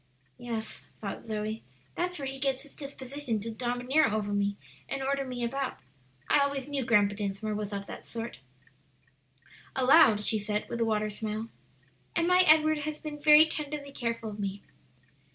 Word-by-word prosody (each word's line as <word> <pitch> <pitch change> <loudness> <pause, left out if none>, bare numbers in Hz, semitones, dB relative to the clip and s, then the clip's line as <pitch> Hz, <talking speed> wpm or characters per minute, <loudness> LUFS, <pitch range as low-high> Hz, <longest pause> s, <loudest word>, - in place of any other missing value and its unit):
"Yes," 230 -2 -5
thought 205 +2 -6
Zoe, 215 0 -3 0.3
"that's 355 +1 -2
where 280 - -4
he 270 0 -4
gets 270 -1 0
his 290 - -13
disposition 275 -4 -4
to 225 +2 -4
domineer 245 +6 +1
over 210 -2 -1
me 200 0 0 0.3
and 275 0 -2
order 275 +1 0
me 250 -2 -4
about. 265 +2 -2 0.5
I - - +5
always 280 -1 0
knew 285 -2 -1
Grandpa 205 -3 +4
Dinsmore 205 +1 -3
was 210 0 -3
of 200 -1 -4
that - - -8
sort." 230 - -6 1.4
Aloud 255 -5 +6
she 220 - +2
said, 210 0 -2
with 235 0 -3
a - - +3
watery 215 -1 0
smile, 215 +1 -4 0.7
"And 335 0 +2
my 360 0 +5
Edward 310 0 +6
has 300 +1 -3
been 300 -1 -7
very 300 +1 +8
tenderly 295 -2 -5
careful 230 -4 -3
of 210 - -9
me." 200 0 -3
245 Hz, 170 wpm, -29 LUFS, 215-280 Hz, 1.4 s, very